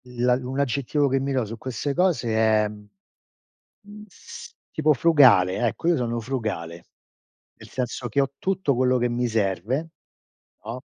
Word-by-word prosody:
La 125 Hz, 0 st, 0 dB
un 130 Hz, +1 st, -3 dB
aggettivo 140 Hz, +1 st, 0 dB
che 135 Hz, 0 st, +1 dB
mi 135 Hz, +1 st, -2 dB
do 130 Hz, -3 st, 0 dB
su 115 Hz, +2 st, -7 dB
queste 130 Hz, +3 st, -3 dB
cose 170 Hz, -9 st, +1 dB
è, 110 Hz, -1 st, +3 dB
mhmm, 105 Hz, -, -16 dB, 0.9 s
s 190 Hz, -, -12 dB, 0.2 s
tipo 155 Hz, 0 st, +2 dB
frugale, 130 Hz, -, +5 dB
ecco 165 Hz, +9 st, -2 dB
io 175 Hz, -, +4 dB
sono 120 Hz, -2 st, -2 dB
frugale. 110 Hz, -9 st, -5 dB, 0.7 s
Nel -, -, -15 dB
senso 125 Hz, -1 st, -4 dB
che 130 Hz, +5 st, +1 dB
ho 135 Hz, -1 st, 0 dB
tutto 185 Hz, -7 st, 0 dB
quello 125 Hz, +1 st, +2 dB
che 120 Hz, 0 st, +1 dB
mi 120 Hz, +1 st, -1 dB
serve, 110 Hz, -, -1 dB, 0.8 s
no. 115 Hz, +4 st, -6 dB
125 Hz, 155 wpm, -24 LUFS, 110-140 Hz, 0.9 s, frugale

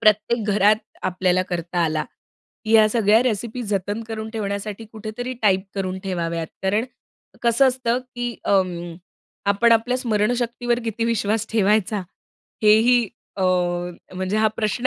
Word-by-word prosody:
प्रत्येक 215 Hz, +2 st, +3 dB
घरात 210 Hz, +1 st, +4 dB, 0.3 s
आपल्याला 185 Hz, 0 st, +1 dB
करता 175 Hz, -1 st, -4 dB
आला, 155 Hz, -1 st, 0 dB, 0.6 s
ह्या 220 Hz, -1 st, +6 dB
सगळ्या 220 Hz, 0 st, +4 dB
रेसिपी 240 Hz, 0 st, -2 dB
जतन 205 Hz, +1 st, -2 dB
करून 220 Hz, 0 st, -5 dB
ठेवण्यासाठी 205 Hz, 0 st, -4 dB
कुठेतरी 220 Hz, +4 st, -5 dB
टाईप 190 Hz, -2 st, +4 dB
करून 190 Hz, -1 st, -2 dB
ठेवाव्यात. 170 Hz, -3 st, -2 dB, 0.2 s
कारण 205 Hz, +5 st, +1 dB, 0.6 s
कसं 235 Hz, +3 st, +4 dB
असतं 250 Hz, -1 st, 0 dB, 0.2 s
की 240 Hz, -1 st, -2 dB
अं, 175 Hz, -3 st, 0 dB, 0.5 s
आपण 215 Hz, +4 st, +4 dB
आपल्या 230 Hz, +3 st, +2 dB
स्मरणशक्तीवर 240 Hz, +1 st, 0 dB
किती 230 Hz, +1 st, -2 dB
विश्वास 220 Hz, -1 st, 0 dB
ठेवायचा? 210 Hz, -1 st, +2 dB, 0.6 s
हेही 225 Hz, +2 st, +5 dB, 0.3 s
अ, 190 Hz, -, -2 dB, 0.7 s
म्हणजे 185 Hz, +3 st, -2 dB
हा 220 Hz, 0 st, +4 dB
प्रश्न 220 Hz, +3 st, 0 dB
215 Hz, 125 wpm, -22 LUFS, 195-230 Hz, 0.7 s, ह्या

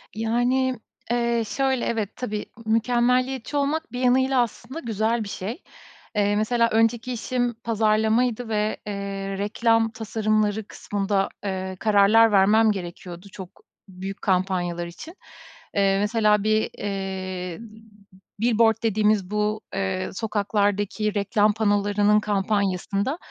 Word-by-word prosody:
Yani, 245 Hz, +3 st, +1 dB, 0.3 s
eee, 235 Hz, -1 st, +1 dB
şöyle, 265 Hz, -1 st, 0 dB
evet, 220 Hz, -3 st, -2 dB
tabii, 215 Hz, -4 st, -4 dB, 0.2 s
mükemmeliyetçi 250 Hz, +4 st, +1 dB
olmak 290 Hz, +3 st, -1 dB
bir 250 Hz, -, -5 dB
yanıyla 260 Hz, 0 st, +3 dB
aslında 240 Hz, +5 st, -5 dB
güzel 225 Hz, -1 st, -1 dB
bir 200 Hz, -, -7 dB
şey. 220 Hz, -, -6 dB, 0.5 s
Eee, 205 Hz, 0 st, +2 dB
mesela, 230 Hz, +2 st, +2 dB
önceki 225 Hz, +2 st, +1 dB
işim 245 Hz, +1 st, -1 dB
pazarlamaydı 220 Hz, +2 st, +1 dB
ve, 215 Hz, 0 st, 0 dB
eee, 195 Hz, -1 st, -4 dB
reklam 225 Hz, +2 st, +1 dB
tasarımları 215 Hz, -1 st, 0 dB
kısmında, 200 Hz, -1 st, -1 dB
eee, 190 Hz, -1 st, -3 dB
kararlar 215 Hz, +1 st, +5 dB
vermem 215 Hz, +3 st, +5 dB
gerekiyordu 175 Hz, -1 st, -7 dB
çok 185 Hz, -2 st, -9 dB, 0.4 s
büyük 190 Hz, +1 st, -7 dB
kampanyalar 180 Hz, -2 st, 0 dB
için. 315 Hz, -, -10 dB, 0.6 s
Eee, 195 Hz, -1 st, +3 dB
mesela, 210 Hz, -1 st, +2 dB
bir, 215 Hz, 0 st, +1 dB
eee, 190 Hz, -3 st, -4 dB, 0.8 s
billboard 225 Hz, 0 st, +3 dB
dediğimiz 210 Hz, -3 st, +1 dB
bu, 210 Hz, +1 st, 0 dB
eee, 190 Hz, -1 st, -2 dB
sokaklardaki 205 Hz, 0 st, 0 dB
reklam 205 Hz, +1 st, +2 dB
panolarının 205 Hz, 0 st, +2 dB
kampanyasında, 200 Hz, -, -1 dB
215 Hz, 110 wpm, -24 LUFS, 200-230 Hz, 0.8 s, kararlar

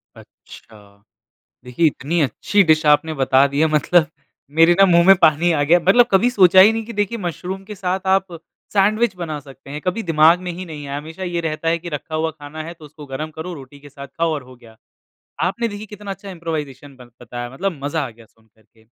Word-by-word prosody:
अच्छा। 100 Hz, -2 st, -17 dB, 0.6 s
देखिए 125 Hz, +7 st, 0 dB
इतनी 155 Hz, +4 st, -2 dB
अच्छी 150 Hz, -, +1 dB
डिश 155 Hz, -2 st, +2 dB
आपने 150 Hz, +2 st, +3 dB
बता 135 Hz, -1 st, +3 dB
दी 140 Hz, +1 st, -3 dB
है 160 Hz, -, +4 dB
मतलब 155 Hz, +2 st, +2 dB, 0.5 s
मेरे 165 Hz, +1 st, +6 dB
ना 195 Hz, -, +8 dB
मुँह 170 Hz, -1 st, +4 dB
में 195 Hz, -, +9 dB
पानी 160 Hz, +2 st, +4 dB
आ 145 Hz, -3 st, +1 dB
गया 170 Hz, +5 st, +4 dB
मतलब 195 Hz, +8 st, +4 dB
कभी 205 Hz, +6 st, +4 dB
सोचा 190 Hz, -6 st, +5 dB
ही 210 Hz, +3 st, +7 dB
नहीं 225 Hz, -1 st, -4 dB
कि 235 Hz, -, -8 dB
देखिए 205 Hz, +3 st, -2 dB
मुशरूम 185 Hz, 0 st, -5 dB
के 210 Hz, +1 st, -9 dB
साथ 185 Hz, 0 st, -2 dB
आप 190 Hz, -1 st, +1 dB, 0.4 s
सैंडविच 215 Hz, +3 st, +2 dB
बना 165 Hz, -4 st, -5 dB
सकते 135 Hz, -1 st, -15 dB
हैं 150 Hz, +1 st, -6 dB
कभी 185 Hz, +5 st, -2 dB
दिमाग 165 Hz, +1 st, +4 dB
ने 180 Hz, -1 st, -4 dB
ही 180 Hz, +2 st, -7 dB
नहीं 150 Hz, -4 st, -9 dB
आया। 140 Hz, +1 st, -4 dB
हमेशा 160 Hz, +5 st, -8 dB
ये 175 Hz, -1 st, -3 dB
रहता 160 Hz, 0 st, -4 dB
है 170 Hz, -, +1 dB
कि 175 Hz, +1 st, -8 dB
रखा 155 Hz, +1 st, -6 dB
हुआ 160 Hz, +1 st, -1 dB
खाना 155 Hz, +1 st, -9 dB
है 165 Hz, +2 st, -8 dB
तो 160 Hz, -2 st, -15 dB
उसको 150 Hz, 0 st, -13 dB
गरम 140 Hz, +3 st, -6 dB
करो 160 Hz, +3 st, -7 dB
रोटी 140 Hz, -2 st, -12 dB
के 145 Hz, +1 st, -14 dB
साथ 140 Hz, 0 st, -10 dB
खाओ 165 Hz, -1 st, -2 dB
और 145 Hz, -4 st, -5 dB
हो 130 Hz, 0 st, -15 dB
गया। 115 Hz, -2 st, -18 dB, 0.7 s
आपने 230 Hz, +6 st, -1 dB
देखिए 205 Hz, 0 st, -7 dB
कितना 205 Hz, -1 st, -8 dB
अच्छा 195 Hz, +1 st, -9 dB
इम्प्रोवाइज़ेशन 150 Hz, -5 st, -6 dB
बन 120 Hz, -1 st, -16 dB
बताया 120 Hz, 0 st, -7 dB
मतलब 170 Hz, +3 st, -4 dB
मज़ा 145 Hz, 0 st, -2 dB
आ -, -, -10 dB
गया 115 Hz, 0 st, -18 dB
सुन 110 Hz, 0 st, -31 dB
कर 110 Hz, +1 st, -31 dB
के। 110 Hz, +1 st, -28 dB
160 Hz, 230 wpm, -19 LUFS, 145-185 Hz, 0.7 s, में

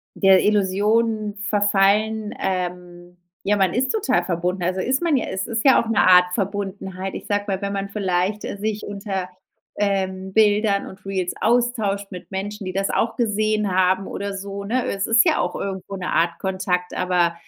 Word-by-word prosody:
der 195 Hz, -2 st, +5 dB
Illusion 210 Hz, +2 st, +1 dB
verfallen, 205 Hz, +1 st, +2 dB
ähm 180 Hz, -1 st, -4 dB, 0.3 s
ja, 205 Hz, +1 st, +1 dB
man 190 Hz, -3 st, +2 dB
ist 260 Hz, +2 st, 0 dB
total 425 Hz, -, +1 dB
verbunden, 180 Hz, +1 st, -2 dB
also 185 Hz, +2 st, -1 dB
ist 260 Hz, +1 st, 0 dB
man 325 Hz, -5 st, +2 dB
ja 245 Hz, -, 0 dB
es 190 Hz, 0 st, -3 dB
ist 230 Hz, 0 st, -2 dB
ja 270 Hz, -, +6 dB
auch 225 Hz, -, -8 dB
‘ne 225 Hz, -, +2 dB
Art 180 Hz, -1 st, +6 dB
Verbundenheit. 195 Hz, -2 st, -4 dB
Ich -, -, -7 dB
sage 205 Hz, 0 st, 0 dB
mal, 195 Hz, 0 st, -2 dB
wenn 200 Hz, 0 st, -2 dB
man 200 Hz, 0 st, -3 dB
vielleicht, 195 Hz, 0 st, -1 dB
äh, 200 Hz, -, -5 dB
sich 215 Hz, 0 st, -3 dB
unter, 195 Hz, -2 st, -4 dB, 0.5 s
ähm, 190 Hz, -2 st, -1 dB
Bildern 210 Hz, -1 st, +3 dB
und 190 Hz, +1 st, -12 dB
Reels 185 Hz, -2 st, -2 dB
austauscht 220 Hz, -4 st, +1 dB
mit 180 Hz, -, -9 dB
Menschen, 200 Hz, +1 st, -5 dB
die 185 Hz, -, -3 dB
das 195 Hz, 0 st, 0 dB
auch 230 Hz, -, 0 dB
gesehen 215 Hz, -3 st, 0 dB
haben 185 Hz, +1 st, +2 dB
oder 200 Hz, 0 st, -4 dB
so, 200 Hz, +1 st, -6 dB
ne? 250 Hz, +5 st, 0 dB
Es 195 Hz, 0 st, -1 dB
ist 225 Hz, 0 st, +5 dB
ja -, -, +3 dB
auch 180 Hz, -, -1 dB
irgendwo 195 Hz, 0 st, -5 dB
‘ne 180 Hz, -1 st, -5 dB
Art 170 Hz, 0 st, +1 dB
Kontakt, 185 Hz, -2 st, -2 dB
aber 180 Hz, -2 st, +1 dB
195 Hz, 180 wpm, -22 LUFS, 185-210 Hz, 0.5 s, ja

